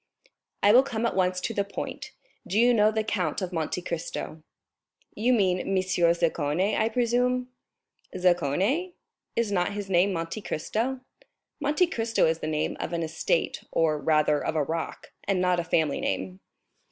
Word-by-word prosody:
"I 205 Hz, -, +7 dB
will 245 Hz, +4 st, +8 dB
come 235 Hz, -4 st, -3 dB
at 235 Hz, -, 0 dB
once 185 Hz, -1 st, +1 dB
to 230 Hz, -, -2 dB
the 200 Hz, -, 0 dB
point. 200 Hz, -, -6 dB, 0.4 s
Do 195 Hz, -, -1 dB
you 245 Hz, +1 st, +5 dB
know 215 Hz, -2 st, +5 dB
the 220 Hz, 0 st, -1 dB
Count 185 Hz, -8 st, -1 dB
of 185 Hz, -2 st, -4 dB
Monte 165 Hz, +2 st, -2 dB
Cristo?" 160 Hz, -1 st, -5 dB, 0.7 s
"You 235 Hz, +4 st, +1 dB
mean 190 Hz, -6 st, +1 dB
Monsieur 185 Hz, -2 st, +2 dB
Zaccone, 170 Hz, +3 st, 0 dB
I 220 Hz, -, +2 dB
presume?" 250 Hz, +1 st, +1 dB, 0.7 s
"Zaccone?—is 200 Hz, -, -1 dB
not 180 Hz, -1 st, 0 dB
his 200 Hz, -1 st, -5 dB
name 185 Hz, +2 st, +4 dB
Monte 165 Hz, +5 st, -4 dB
Cristo?" 235 Hz, +10 st, -2 dB, 0.6 s
"Monte 300 Hz, +4 st, +2 dB
Cristo 230 Hz, -9 st, 0 dB
is 160 Hz, 0 st, +1 dB
the 155 Hz, -, -4 dB
name 155 Hz, -1 st, -1 dB
of 175 Hz, -, -4 dB
an 170 Hz, -1 st, -1 dB
estate, 160 Hz, -, -1 dB
or, 155 Hz, -2 st, +2 dB
rather, 150 Hz, 0 st, +2 dB
of -, -, -2 dB
a 155 Hz, -, +2 dB
rock, 165 Hz, +3 st, -5 dB
and 195 Hz, -2 st, +1 dB
not 180 Hz, -1 st, +2 dB
a -, -, 0 dB
family 160 Hz, -3 st, +1 dB
name." 95 Hz, -1 st, -3 dB
185 Hz, 165 wpm, -27 LUFS, 165-225 Hz, 0.7 s, will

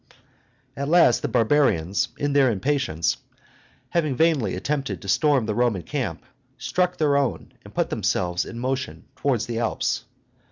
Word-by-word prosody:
At 140 Hz, +1 st, -3 dB
last 170 Hz, -8 st, +5 dB
the -, -, -1 dB
barbarians, 110 Hz, -, +2 dB
in 145 Hz, 0 st, -1 dB
their 140 Hz, -2 st, +5 dB
impatience, 110 Hz, -, 0 dB, 0.7 s
having 155 Hz, -6 st, 0 dB
vainly 160 Hz, -5 st, +2 dB
attempted 140 Hz, -1 st, -2 dB
to -, -, -9 dB
storm 140 Hz, +4 st, +3 dB
the 110 Hz, -, -1 dB
Roman 115 Hz, -6 st, +1 dB
camp, -, -, -3 dB, 0.3 s
struck 180 Hz, +1 st, 0 dB
their 145 Hz, -3 st, +2 dB
own, 140 Hz, -3 st, -1 dB
and -, -, -13 dB
put -, -, -1 dB
themselves 90 Hz, -1 st, 0 dB
in 115 Hz, -, -8 dB
motion 130 Hz, +2 st, -3 dB
towards 130 Hz, -6 st, 0 dB
the 115 Hz, -1 st, -3 dB
Alps. 115 Hz, -2 st, -1 dB
130 Hz, 150 wpm, -24 LUFS, 110-145 Hz, 0.7 s, last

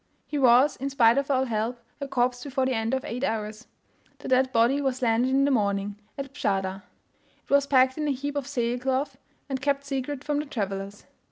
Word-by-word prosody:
He 295 Hz, -, -3 dB
was, 255 Hz, +2 st, +5 dB
in 275 Hz, +2 st, -3 dB
spite 240 Hz, -2 st, +4 dB
of 280 Hz, -, -4 dB
all 265 Hz, -1 st, +2 dB
help, 230 Hz, +1 st, -2 dB, 0.2 s
a 280 Hz, -, -4 dB
corpse 250 Hz, -2 st, 0 dB
before 265 Hz, -2 st, -1 dB
the 260 Hz, -, 0 dB
end 225 Hz, +2 st, 0 dB
of 265 Hz, -, -4 dB
eight 245 Hz, +4 st, -4 dB
hours. 215 Hz, 0 st, -3 dB, 0.5 s
The -, -, -9 dB
dead 260 Hz, 0 st, +3 dB
body 250 Hz, +4 st, +3 dB
was 260 Hz, -2 st, -1 dB
landed 235 Hz, +2 st, +2 dB
in 270 Hz, +1 st, +3 dB
the 285 Hz, -, +2 dB
morning, 200 Hz, -3 st, 0 dB, 0.2 s
at 275 Hz, -1 st, -6 dB
Bschada; 195 Hz, -6 st, -1 dB, 0.6 s
it -, -, -33 dB
was 280 Hz, 0 st, +4 dB
packed 260 Hz, +1 st, +3 dB
in 300 Hz, -, -1 dB
a -, -, +2 dB
heap 285 Hz, +2 st, -3 dB
of 285 Hz, -3 st, -2 dB
sail 240 Hz, 0 st, -1 dB
cloth, 265 Hz, +1 st, -1 dB, 0.3 s
and 265 Hz, -2 st, -3 dB
kept 280 Hz, 0 st, 0 dB
secret 275 Hz, 0 st, -3 dB
from 295 Hz, -1 st, -1 dB
the 300 Hz, -, -4 dB
travellers. 200 Hz, -4 st, -4 dB
260 Hz, 210 wpm, -26 LUFS, 230-275 Hz, 0.6 s, was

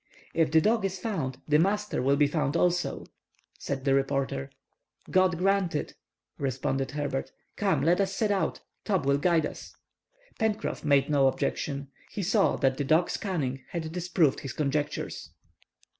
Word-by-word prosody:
"If 165 Hz, -1 st, +2 dB
the 160 Hz, +1 st, +5 dB
dog 220 Hz, +3 st, +2 dB
is 195 Hz, -1 st, -1 dB
found, 160 Hz, -, -3 dB
the 150 Hz, 0 st, +4 dB
master 210 Hz, -1 st, +1 dB
will 135 Hz, +2 st, +3 dB
be 145 Hz, +1 st, +4 dB
found 150 Hz, +1 st, 0 dB
also," 180 Hz, 0 st, 0 dB, 0.5 s
said 135 Hz, -1 st, -4 dB
the 135 Hz, -, +3 dB
reporter. 135 Hz, -, 0 dB, 0.6 s
"God 185 Hz, -2 st, +3 dB
grant 190 Hz, -2 st, +1 dB
it!" 150 Hz, -, -3 dB, 0.5 s
responded 135 Hz, 0 st, -1 dB
Herbert. 140 Hz, -2 st, -3 dB, 0.2 s
"Come, 190 Hz, -9 st, +1 dB
let 175 Hz, +5 st, +3 dB
us 195 Hz, -1 st, 0 dB
set 210 Hz, 0 st, +1 dB
out. 195 Hz, -2 st, 0 dB, 0.2 s
Top 190 Hz, -9 st, 0 dB
will 140 Hz, 0 st, +3 dB
guide 165 Hz, -1 st, +3 dB
us!" -, -, -8 dB, 0.6 s
Pencroff 220 Hz, 0 st, -1 dB
made 140 Hz, -2 st, +3 dB
no 140 Hz, -2 st, +4 dB
objection. 140 Hz, +1 st, -2 dB, 0.2 s
He 200 Hz, -, -4 dB
saw 200 Hz, +2 st, +3 dB
that 130 Hz, -1 st, +1 dB
the 145 Hz, -, 0 dB
dog's 160 Hz, +5 st, +2 dB
cunning 140 Hz, -, -2 dB
had 160 Hz, -2 st, -4 dB
disproved 170 Hz, -4 st, +1 dB
his 135 Hz, -, -6 dB
conjectures. 145 Hz, 0 st, -2 dB
155 Hz, 160 wpm, -28 LUFS, 140-185 Hz, 0.6 s, the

